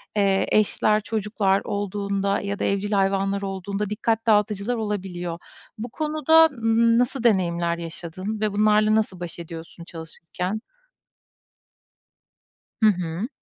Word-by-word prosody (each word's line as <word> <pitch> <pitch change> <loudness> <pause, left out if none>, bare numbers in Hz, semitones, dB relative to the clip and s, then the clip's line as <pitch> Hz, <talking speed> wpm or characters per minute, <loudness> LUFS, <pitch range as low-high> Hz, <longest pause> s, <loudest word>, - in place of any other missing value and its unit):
eee, 195 -2 +2
eşler, 215 0 +3
çocuklar 210 -2 0
olduğunda 200 0 -1
ya 200 0 -4
da - - -2
evcil 200 +1 -1
hayvanlar 195 0 +1
olduğunda 195 +1 -3
dikkat 225 +1 -1
dağıtıcılar 210 +1 +2
olabiliyor. 185 -6 -4 0.4
Bu 225 +2 -5
konuda, 310 +3 +4
ımm, 230 -4 +2
nasıl 250 0 0
deneyimler 170 -6 +2
yaşadın 180 +5 -6
ve 215 -2 0
bunlarla 215 +1 +3
nasıl 210 -4 0
baş 175 -1 -7
ediyorsun 165 0 -9
çalışırken? 175 +4 -5 2.2
Hı - - +8
hı. 180 +2 -3
200 Hz, 115 wpm, -24 LUFS, 185-215 Hz, 2.2 s, Hı